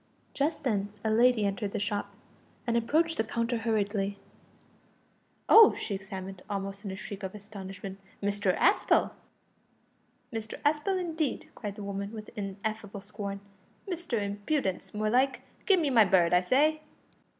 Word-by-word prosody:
Just 295 Hz, +2 st, -1 dB
then 205 Hz, -6 st, 0 dB
a 220 Hz, -, +1 dB
lady 235 Hz, -1 st, +4 dB
entered 200 Hz, 0 st, -2 dB
the -, -, -1 dB
shop, 205 Hz, 0 st, -2 dB, 0.5 s
and 235 Hz, -1 st, 0 dB
approached 315 Hz, +8 st, +2 dB
the -, -, +2 dB
counter 230 Hz, +1 st, -1 dB
hurriedly. 205 Hz, -3 st, 0 dB, 1.3 s
"Oh!" 445 Hz, -1 st, +9 dB
she 210 Hz, -, -4 dB
exclaimed, 190 Hz, -1 st, -6 dB
almost 195 Hz, 0 st, -4 dB
in 200 Hz, -, -4 dB
a 190 Hz, -, -4 dB
shriek 200 Hz, +1 st, -7 dB
of 190 Hz, 0 st, -5 dB
astonishment, 195 Hz, -2 st, -8 dB, 0.2 s
"Mr 205 Hz, -2 st, 0 dB
Aspel!" 405 Hz, -, +3 dB, 1.2 s
"Mr 220 Hz, -1 st, -4 dB
Aspel, 305 Hz, +6 st, +2 dB
indeed," 325 Hz, -4 st, -2 dB
cried 205 Hz, -3 st, -6 dB
the 210 Hz, -, -7 dB
woman, 200 Hz, 0 st, -4 dB
with 215 Hz, -1 st, -8 dB
ineffable 205 Hz, 0 st, -4 dB
scorn, 200 Hz, -1 st, -6 dB, 0.5 s
"Mr 345 Hz, -, -2 dB
Impudence, 205 Hz, -, -2 dB
more 215 Hz, 0 st, -1 dB
like. 260 Hz, +2 st, +2 dB, 0.2 s
Give 390 Hz, -3 st, +6 dB
me 300 Hz, -4 st, +1 dB
my 225 Hz, -4 st, +7 dB
bird, 180 Hz, -3 st, +4 dB
I 180 Hz, -, +6 dB
say!" 300 Hz, +10 st, +3 dB
210 Hz, 145 wpm, -29 LUFS, 200-250 Hz, 1.3 s, Oh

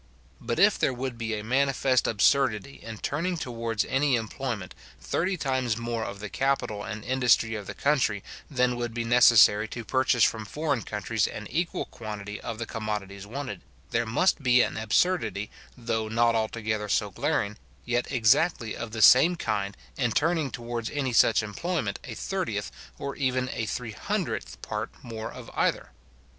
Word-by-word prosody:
But -, -, -3 dB
if -, -, +5 dB
there 130 Hz, -, +1 dB
would 130 Hz, 0 st, -4 dB
be 115 Hz, -1 st, -3 dB
a 105 Hz, -, -5 dB
manifest 130 Hz, +1 st, +2 dB
absurdity 130 Hz, +2 st, +2 dB
in 115 Hz, -1 st, -7 dB
turning 170 Hz, -, -2 dB
towards 115 Hz, -6 st, -2 dB
any 135 Hz, 0 st, +2 dB
employment 115 Hz, -3 st, -4 dB, 0.3 s
thirty 185 Hz, +2 st, -1 dB
times 130 Hz, -6 st, 0 dB
more 115 Hz, -1 st, -2 dB
of 100 Hz, -2 st, -6 dB
the 105 Hz, -, -5 dB
capital 120 Hz, -5 st, -1 dB
and 105 Hz, 0 st, -6 dB
industry 125 Hz, -3 st, +3 dB
of 105 Hz, -2 st, -5 dB
the -, -, -6 dB
country 130 Hz, -9 st, +1 dB, 0.3 s
than 125 Hz, -3 st, +1 dB
would 120 Hz, -1 st, -3 dB
be 120 Hz, -, -1 dB
necessary 115 Hz, -3 st, +6 dB
to 115 Hz, 0 st, -7 dB
purchase 130 Hz, -1 st, +2 dB
from 110 Hz, -1 st, +2 dB
foreign 145 Hz, +2 st, -1 dB
countries 105 Hz, +1 st, -1 dB
an 105 Hz, -, -7 dB
equal 170 Hz, +1 st, -1 dB
quantity 105 Hz, -2 st, -7 dB
of 115 Hz, -, -5 dB
the 115 Hz, -, -3 dB
commodities 105 Hz, -3 st, -5 dB
wanted, 120 Hz, -5 st, -5 dB, 0.3 s
there 115 Hz, 0 st, 0 dB
must 160 Hz, +9 st, +2 dB
be 125 Hz, -2 st, +5 dB
an -, -, -2 dB
absurdity, 110 Hz, -, +1 dB, 0.3 s
though 115 Hz, -2 st, -2 dB
not 115 Hz, +1 st, +3 dB
altogether 110 Hz, -1 st, -1 dB
so -, -, +1 dB
glaring, 105 Hz, +1 st, -1 dB, 0.3 s
yet 120 Hz, +1 st, -1 dB
exactly 115 Hz, 0 st, +2 dB
of 115 Hz, -1 st, -6 dB
the 110 Hz, -2 st, +1 dB
same 165 Hz, +8 st, +8 dB
kind, 100 Hz, -, -2 dB, 0.2 s
in 120 Hz, -4 st, +1 dB
turning 160 Hz, -2 st, +1 dB
towards 120 Hz, -2 st, -4 dB
any 135 Hz, -4 st, -2 dB
such 115 Hz, -1 st, +5 dB
employment 110 Hz, -, -2 dB
a -, -, -7 dB
thirtieth, -, -, -3 dB, 0.3 s
or 140 Hz, 0 st, -5 dB
even 130 Hz, -2 st, 0 dB
a 115 Hz, -, -3 dB
three 115 Hz, +1 st, -4 dB
hundredth 65 Hz, -, -3 dB
part -, -, -3 dB
more 110 Hz, -2 st, -6 dB
of -, -, -10 dB
either. -, -, 0 dB
115 Hz, 165 wpm, -27 LUFS, 110-130 Hz, 0.3 s, same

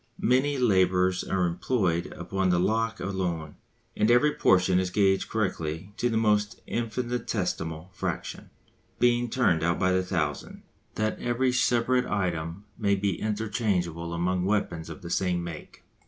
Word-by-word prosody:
Many 135 Hz, +4 st, +2 dB
labourers 95 Hz, -5 st, +3 dB
are 95 Hz, -2 st, 0 dB
employed 85 Hz, -1 st, 0 dB
upon 95 Hz, +2 st, -1 dB
the 90 Hz, -1 st, +3 dB
lock 115 Hz, +4 st, 0 dB
alone. 90 Hz, -5 st, -3 dB, 0.4 s
And 105 Hz, -, +2 dB
every 135 Hz, +5 st, +4 dB
portion 90 Hz, 0 st, +3 dB
is 95 Hz, -1 st, -1 dB
gauged 95 Hz, 0 st, +2 dB
correctly 95 Hz, -3 st, -2 dB
to 120 Hz, -, +1 dB
the 115 Hz, -, 0 dB
most 105 Hz, -1 st, +1 dB
infinitesimal 110 Hz, -8 st, -3 dB
fraction, -, -, -4 dB, 0.5 s
being 120 Hz, 0 st, +2 dB
turned 110 Hz, -10 st, +2 dB
out 85 Hz, +1 st, +1 dB
by 95 Hz, 0 st, +2 dB
the 95 Hz, 0 st, +2 dB
thousand, 80 Hz, -6 st, -3 dB, 0.3 s
that 110 Hz, 0 st, -1 dB
every 125 Hz, +1 st, +1 dB
separate 125 Hz, 0 st, +2 dB
item 90 Hz, 0 st, -2 dB
may 100 Hz, -3 st, +2 dB
be 100 Hz, -2 st, -1 dB
interchangeable 100 Hz, -6 st, -1 dB
among 90 Hz, +1 st, 0 dB
weapons 90 Hz, -5 st, -1 dB
of 80 Hz, -, -9 dB
the 85 Hz, -, -6 dB
same 90 Hz, -2 st, 0 dB
make. 85 Hz, -2 st, -9 dB
95 Hz, 140 wpm, -27 LUFS, 85-115 Hz, 0.5 s, every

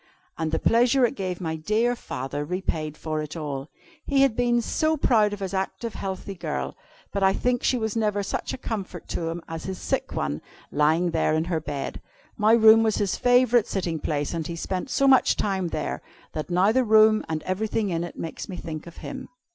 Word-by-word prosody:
And 160 Hz, -1 st, -2 dB
the 160 Hz, -, +1 dB
pleasure 245 Hz, +3 st, +4 dB
it 235 Hz, -, -1 dB
gave 185 Hz, -3 st, -4 dB
my 160 Hz, -3 st, -2 dB
dear 215 Hz, +9 st, +1 dB
father 145 Hz, -, -4 dB
repaid 155 Hz, -2 st, -3 dB
for 155 Hz, -1 st, -3 dB
all. 145 Hz, -2 st, -4 dB, 0.3 s
He 275 Hz, -1 st, +3 dB
had 265 Hz, -5 st, +3 dB
been 240 Hz, 0 st, +2 dB, 0.4 s
proud 215 Hz, -6 st, +4 dB
of 205 Hz, -1 st, -6 dB
his 190 Hz, -1 st, -3 dB
active, 195 Hz, +4 st, -3 dB
healthy 195 Hz, +1 st, -5 dB
girl, 150 Hz, -, -4 dB, 0.4 s
but 200 Hz, -, -1 dB
I 190 Hz, 0 st, +4 dB
think 245 Hz, +2 st, 0 dB
she 255 Hz, -, +2 dB
was 220 Hz, -2 st, -2 dB
never 210 Hz, -2 st, +1 dB
such -, -, -3 dB
a -, -, -4 dB
comfort 215 Hz, -6 st, -5 dB
to 165 Hz, -1 st, -2 dB
him 165 Hz, 0 st, -5 dB
as 165 Hz, 0 st, -6 dB
his 190 Hz, -1 st, -4 dB
sick -, -, -2 dB
one, 70 Hz, +2 st, -2 dB, 0.3 s
lying 160 Hz, +4 st, +2 dB
there 160 Hz, -1 st, +1 dB
in 160 Hz, -, +1 dB
her 170 Hz, -1 st, -1 dB
bed. 145 Hz, -2 st, -5 dB, 0.3 s
My 215 Hz, 0 st, +4 dB
room 220 Hz, -1 st, +8 dB
was 220 Hz, -2 st, +2 dB
his 200 Hz, -3 st, 0 dB
favorite 245 Hz, -2 st, +4 dB
sitting 175 Hz, -5 st, -2 dB
place, 145 Hz, 0 st, -2 dB
and 165 Hz, -2 st, -3 dB
he 170 Hz, -, -4 dB
spent 185 Hz, +8 st, -3 dB
so 275 Hz, -, +2 dB
much 265 Hz, -1 st, +5 dB
time 190 Hz, -3 st, -1 dB
there, 155 Hz, -2 st, -3 dB, 0.3 s
that 155 Hz, +2 st, -4 dB
now 180 Hz, +4 st, +4 dB
the 260 Hz, +3 st, +3 dB
room, 215 Hz, -1 st, +5 dB
and 155 Hz, -1 st, -2 dB
everything 205 Hz, +2 st, -1 dB
in 165 Hz, 0 st, -1 dB
it, 175 Hz, -, -7 dB
makes 165 Hz, -, -6 dB
me 185 Hz, -, -5 dB
think 155 Hz, -1 st, -6 dB
of 170 Hz, -, -12 dB
him." 265 Hz, -1 st, -7 dB
190 Hz, 205 wpm, -25 LUFS, 160-220 Hz, 0.4 s, room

